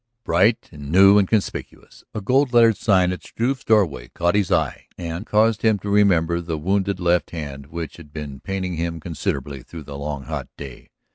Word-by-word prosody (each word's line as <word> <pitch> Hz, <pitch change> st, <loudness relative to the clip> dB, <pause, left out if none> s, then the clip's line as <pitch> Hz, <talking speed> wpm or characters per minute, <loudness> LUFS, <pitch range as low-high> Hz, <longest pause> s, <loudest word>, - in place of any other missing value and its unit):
Bright 95 Hz, +7 st, +2 dB
and 75 Hz, -2 st, -9 dB
new 95 Hz, +3 st, +7 dB
and 100 Hz, -, +2 dB
conspicuous, 110 Hz, -1 st, -3 dB
a 110 Hz, -, -3 dB
gold 130 Hz, +5 st, +2 dB
lettered 115 Hz, -2 st, +6 dB
sign 95 Hz, -4 st, +2 dB
at 90 Hz, -, -5 dB
Struve's 130 Hz, +3 st, -2 dB
doorway 90 Hz, -, +2 dB
caught 85 Hz, +7 st, 0 dB
his 100 Hz, -3 st, +1 dB
eye -, -, 0 dB
and 85 Hz, +4 st, -5 dB
caused 110 Hz, 0 st, +2 dB
him 110 Hz, -2 st, +3 dB
to 100 Hz, +1 st, -5 dB
remember 85 Hz, -5 st, +3 dB
the 85 Hz, -2 st, -4 dB
wounded 95 Hz, +3 st, 0 dB
left 85 Hz, -3 st, +1 dB
hand 70 Hz, -4 st, -7 dB
which 80 Hz, -1 st, -6 dB
had 80 Hz, -4 st, -14 dB
been 75 Hz, -3 st, -7 dB
paining 95 Hz, -2 st, -4 dB
him 85 Hz, 0 st, -3 dB
considerably 70 Hz, -4 st, -4 dB
through 80 Hz, +5 st, -10 dB
the 70 Hz, 0 st, -8 dB
long 70 Hz, -1 st, -4 dB
hot -, -, -5 dB
day. 70 Hz, -4 st, -10 dB
85 Hz, 190 wpm, -22 LUFS, 75-100 Hz, -, new